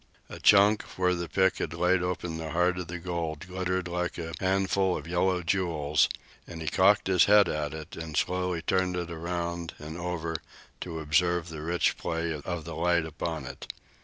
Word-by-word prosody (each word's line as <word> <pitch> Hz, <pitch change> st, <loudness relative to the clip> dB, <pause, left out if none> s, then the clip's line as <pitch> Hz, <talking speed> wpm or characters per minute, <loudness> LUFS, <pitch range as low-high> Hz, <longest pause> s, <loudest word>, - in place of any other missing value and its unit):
A -, -, -8 dB
chunk, 105 Hz, +1 st, +6 dB, 0.2 s
where 90 Hz, -1 st, +3 dB
the 85 Hz, -2 st, -3 dB
pick 95 Hz, +3 st, +2 dB
had 80 Hz, -, -3 dB
laid 90 Hz, +2 st, +2 dB
open 90 Hz, -2 st, -3 dB
the 80 Hz, -1 st, -4 dB
heart 90 Hz, +1 st, +2 dB
of 90 Hz, -, -5 dB
the 90 Hz, +2 st, -5 dB
gold, 85 Hz, -3 st, -4 dB
glittered 90 Hz, 0 st, -2 dB
like 90 Hz, 0 st, -2 dB
a 85 Hz, -1 st, -5 dB
handful 95 Hz, 0 st, +1 dB
of 75 Hz, -, -8 dB
yellow 90 Hz, +1 st, +1 dB
jewels, 80 Hz, -4 st, +1 dB, 0.4 s
and 85 Hz, -2 st, -8 dB
he 80 Hz, -, -6 dB
cocked -, -, +4 dB
his 95 Hz, -2 st, +5 dB
head 105 Hz, 0 st, +6 dB
at 75 Hz, 0 st, -2 dB
it 80 Hz, -1 st, -8 dB
and 80 Hz, -2 st, -5 dB
slowly 90 Hz, -2 st, 0 dB
turned 95 Hz, -1 st, +1 dB
it 85 Hz, -1 st, -4 dB
around 85 Hz, 0 st, -4 dB
and 80 Hz, +3 st, -8 dB
over 85 Hz, -2 st, -3 dB, 0.4 s
to 85 Hz, -3 st, -5 dB
observe 85 Hz, +3 st, +1 dB
the 80 Hz, -1 st, -7 dB
rich 85 Hz, +3 st, +1 dB
play 85 Hz, 0 st, -2 dB
of 80 Hz, +2 st, -5 dB
the 85 Hz, -, -6 dB
light 85 Hz, -1 st, +2 dB
upon 80 Hz, -1 st, -4 dB
it. -, -, -7 dB
85 Hz, 190 wpm, -28 LUFS, 80-90 Hz, 0.4 s, chunk